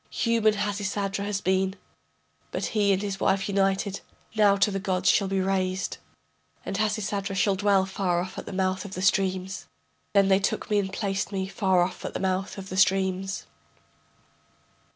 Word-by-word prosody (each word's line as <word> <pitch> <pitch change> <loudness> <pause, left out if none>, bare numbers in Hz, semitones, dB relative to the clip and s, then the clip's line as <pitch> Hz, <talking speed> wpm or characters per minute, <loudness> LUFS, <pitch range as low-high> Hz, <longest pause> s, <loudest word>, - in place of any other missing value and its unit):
Human 225 -2 +2
Hasisadra 200 -1 -2
has 205 -1 -2
been, 190 +1 +1 0.7
But - - -3
he 205 -2 +3
and 195 +1 +1
his 195 -1 -3
wife 195 0 +1
united 195 0 0 0.3
Now 205 -2 +5
to 200 +1 +2
the 195 - -2
gods 185 -2 +2
shall 200 - +2
be 195 0 0
raised, 185 0 -1 0.7
And - - -3
Hasisadra 205 -2 -1
shall 195 +1 +3
dwell 195 -1 +3
far 190 -2 0
off 185 +2 -5
at - - -9
the - - -5
mouth 185 -1 0
of 195 -1 -8
the 185 - -3
streams. 190 0 0 0.5
Then 200 -1 +5
they 190 0 +4
took 200 - -2
me 210 - +4
and 190 -1 -2
placed 195 0 -2
me 190 -1 -2
Far 190 -2 +2
off 180 +1 -4
at - - -5
the - - -1
mouth 190 +1 -1
of 195 -1 -7
the 185 - -4
streams. 190 0 +1
195 Hz, 175 wpm, -26 LUFS, 190-200 Hz, 0.7 s, Now